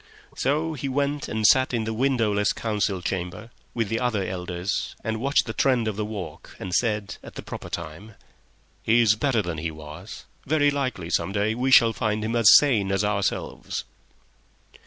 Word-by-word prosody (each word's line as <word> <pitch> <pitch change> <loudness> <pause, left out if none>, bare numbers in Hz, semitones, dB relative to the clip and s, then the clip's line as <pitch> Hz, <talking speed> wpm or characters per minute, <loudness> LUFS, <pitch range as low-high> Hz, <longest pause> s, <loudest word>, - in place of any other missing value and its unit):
So 155 +4 0
he 140 -2 -4
went 140 +2 -1
and 110 0 -2
sat 130 +2 +5
in 115 - 0
the 110 0 -3
windowless 110 -5 +1
council 105 -4 -1
chamber 95 +5 -4 0.2
with 115 -3 0
the 115 +2 -1
other 120 -6 0
elders 90 +1 -3
and 110 -1 -2
watched 140 +2 +2
the 110 - -4
trend 125 -4 +2
of 110 - -2
the 105 - -2
talk, 100 -8 -8
and 90 -1 -6
said, 105 -3 0
at - - -12
the - - -7
proper - - -8
time, 85 +6 -7 0.7
"He's 115 -1 +4
better 115 -1 +1
than 85 -3 -4
he 85 +1 -2
was. 80 +8 -10 0.2
Very 145 0 +3
likely, 130 -12 -3
some 95 - 0
day, 105 +2 +1
we 125 +3 -1
shall 115 -3 +6
find 110 -1 -1
him 115 +2 -2
as 115 -3 +8
sane 110 -10 +2
as 95 +1 +1
ourselves." 105 -1 -2
110 Hz, 180 wpm, -25 LUFS, 95-125 Hz, 0.7 s, as